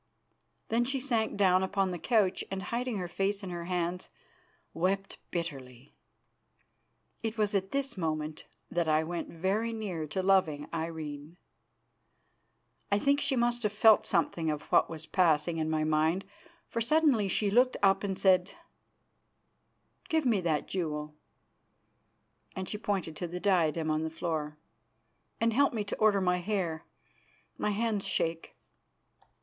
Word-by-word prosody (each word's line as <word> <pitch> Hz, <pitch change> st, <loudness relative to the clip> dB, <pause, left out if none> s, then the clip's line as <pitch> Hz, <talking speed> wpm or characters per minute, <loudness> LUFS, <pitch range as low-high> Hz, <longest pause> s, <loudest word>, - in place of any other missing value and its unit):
Then 235 Hz, +1 st, +2 dB
she 270 Hz, +2 st, -1 dB
sank 235 Hz, -6 st, 0 dB
down 185 Hz, -2 st, +4 dB
upon 190 Hz, 0 st, 0 dB
the 175 Hz, -, -4 dB
couch, 210 Hz, -5 st, +2 dB
and, 195 Hz, 0 st, -4 dB
hiding 240 Hz, +2 st, -2 dB
her 180 Hz, -2 st, -3 dB
face 195 Hz, +4 st, -1 dB
in 185 Hz, -, -5 dB
her 170 Hz, -1 st, -5 dB
hands, 180 Hz, 0 st, -2 dB, 0.6 s
wept 195 Hz, +3 st, -1 dB
bitterly. 135 Hz, -7 st, -6 dB, 1.3 s
It 225 Hz, 0 st, -3 dB
was 210 Hz, -1 st, +1 dB
at 195 Hz, -1 st, 0 dB
this 275 Hz, +2 st, -2 dB
moment 155 Hz, -3 st, -3 dB, 0.2 s
that 170 Hz, -1 st, 0 dB
I 155 Hz, 0 st, +3 dB
went 170 Hz, +1 st, -4 dB
very 195 Hz, +7 st, -1 dB
near 190 Hz, -8 st, -4 dB
to 185 Hz, +5 st, -2 dB
loving 180 Hz, -7 st, +2 dB
Irene. 160 Hz, -1 st, -5 dB, 1.5 s
I 200 Hz, -, +4 dB
think 280 Hz, +6 st, +2 dB
she 275 Hz, -1 st, +1 dB
must 240 Hz, 0 st, +1 dB
have 210 Hz, -2 st, -1 dB
felt 215 Hz, +1 st, +5 dB
something 165 Hz, -2 st, 0 dB
of 150 Hz, -1 st, -2 dB
what -, -, +4 dB
was 160 Hz, -1 st, -7 dB
passing 165 Hz, -2 st, +2 dB
in 155 Hz, 0 st, -1 dB
my 155 Hz, -1 st, +1 dB
mind, 155 Hz, +4 st, +1 dB, 0.4 s
for 230 Hz, -, -3 dB
suddenly 265 Hz, -4 st, +3 dB
she 200 Hz, +2 st, +1 dB
looked 250 Hz, +4 st, +4 dB
up 195 Hz, 0 st, +4 dB
and 195 Hz, -2 st, -2 dB
said: 185 Hz, -2 st, +3 dB, 1.6 s
"Give 320 Hz, -4 st, +1 dB
me 220 Hz, -6 st, +3 dB
that 160 Hz, -4 st, 0 dB
jewel," 150 Hz, -4 st, -3 dB, 1.4 s
and 190 Hz, -1 st, -4 dB
she 210 Hz, -, -4 dB
pointed 190 Hz, -7 st, -2 dB
to 175 Hz, -, -3 dB
the 175 Hz, +2 st, -5 dB
diadem 165 Hz, -5 st, +2 dB
on 155 Hz, 0 st, 0 dB
the 160 Hz, -, -2 dB
floor, 155 Hz, -2 st, -3 dB, 0.8 s
"and 230 Hz, 0 st, +2 dB
help 280 Hz, +3 st, +3 dB
me 215 Hz, -, 0 dB
to 200 Hz, -, -5 dB
order 210 Hz, -2 st, +4 dB
my 180 Hz, -1 st, +2 dB
hair; 175 Hz, -4 st, -2 dB, 0.7 s
my -, -, 0 dB
hands 210 Hz, -1 st, -1 dB
shake." 165 Hz, 0 st, -2 dB
185 Hz, 150 wpm, -30 LUFS, 160-210 Hz, 1.6 s, felt